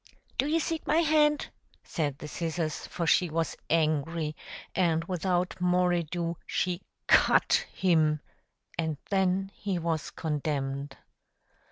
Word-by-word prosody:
"Do 275 - +3
you 320 +2 +2
seek 325 0 -3
my 310 - +3
hand?" 300 -2 +3 0.3
said 145 -5 -2
the 150 - -8
scissors; 165 0 -3
for 170 - -3
she 170 +2 +4
was 165 0 -1
angry; 155 0 +1 0.4
and 165 -3 +2
without 180 0 -1
more 180 0 +3
ado, 170 0 -2
she 180 0 -1 0.2
CUT - - +4
HIM, 155 -4 +2 0.6
and 160 -3 0
then 190 0 +1
he 195 -3 -2
was 165 -3 -1
condemned. 140 -3 -3
170 Hz, 125 wpm, -29 LUFS, 155-185 Hz, 0.6 s, she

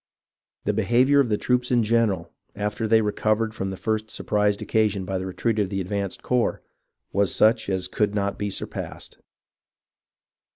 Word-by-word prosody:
The 105 - 0
behaviour 120 +7 +3
of 135 -4 +3
the 105 - +2
troops 125 +1 0
in 120 -2 +3
general, 110 -3 +1 0.2
after 105 +2 -2
they 110 0 +4
recovered 110 +1 0
from 95 -3 -3
the 95 - -5
first 110 +1 -2
surprise 105 -1 0
occasioned 105 -3 0
by 95 0 -2
the 95 - -4
retreat 110 +4 -1
of 100 -3 +1
the 95 -1 -2
advanced 100 +1 -3
corps, 125 -1 0 0.5
was 100 -1 +1
such 110 -1 +3
as 95 -1 -1
could 105 +2 0
not 100 -1 -1
be 105 0 -1
sur - - -4
passed. - - -7
105 Hz, 170 wpm, -24 LUFS, 100-115 Hz, 0.5 s, they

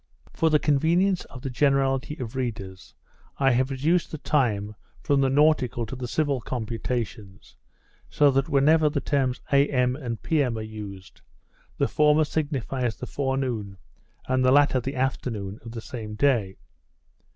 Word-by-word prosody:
For 165 - +2
the 155 - +4
convenience 170 +6 +2
of 125 - -12
the 135 - -3
generality 135 +1 +1
of 125 -4 -6
readers, 105 -7 -5 0.4
I 135 -1 +3
have 130 +2 +1
reduced 155 +6 +1
the 155 - -4
time 110 -9 0 0.3
from 140 -3 +2
the 135 - +3
nautical 135 -4 +2
to 120 - -7
the 125 -1 -5
civil 140 -1 0
computation, 115 -3 -4 0.7
so 145 -1 +4
that 135 +1 0
whenever 150 +3 +4
the 145 -1 -1
terms 135 -3 -1
A.M. 130 -3 +3
and 120 -6 -5
P.M. 140 -8 +1
are 110 - -4
used, 105 -4 -9 0.6
the - - +2
former 150 +1 +3
signifies 135 -6 -2
the 125 - -7
forenoon, 130 -8 -2 0.5
and 130 0 +1
the 130 - +4
latter 140 -1 +4
the 135 +3 -5
afternoon 115 -6 -3
of 115 - -8
the 115 -1 -6
same 110 -3 -7
day. 110 -7 +1
130 Hz, 150 wpm, -25 LUFS, 115-145 Hz, 0.7 s, the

